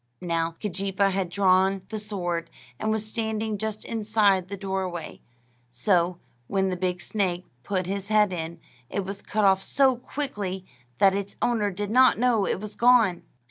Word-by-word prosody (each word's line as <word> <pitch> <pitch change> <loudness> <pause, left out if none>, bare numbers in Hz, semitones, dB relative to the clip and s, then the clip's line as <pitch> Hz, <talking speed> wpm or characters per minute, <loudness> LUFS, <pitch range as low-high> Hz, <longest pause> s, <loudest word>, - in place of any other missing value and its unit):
Now, 165 -1 -1
Keejeepaa 195 0 0
had 190 -2 -1
drawn 190 0 +3
the 220 - -4
sword, 180 -5 -3 0.3
and 215 - -1
was 220 0 0
standing 220 -1 -2
just 215 0 -3
inside 210 -4 +2
the 200 - -6
doorway; 190 -3 -4 0.5
so, 175 - +1 0.3
when 190 -1 +1
the 185 - -1
big 180 -1 -2
snake 185 -4 -1 0.2
put 185 +4 -2
his 195 +1 -3
head 210 -3 +3
in, 165 -1 -5 0.3
it 200 - -2
was 195 +1 -6
cut 215 -1 0
off 190 -1 +4
so 260 +4 +3
quickly 205 -9 -4 0.3
that 195 -1 +5
its 200 0 -4
owner 225 -4 +1
did 205 +2 -4
not 255 +2 +6
know 230 -4 +2
it - - -1
was 210 +1 -7
gone. 235 -7 +4
195 Hz, 165 wpm, -26 LUFS, 185-215 Hz, 0.5 s, not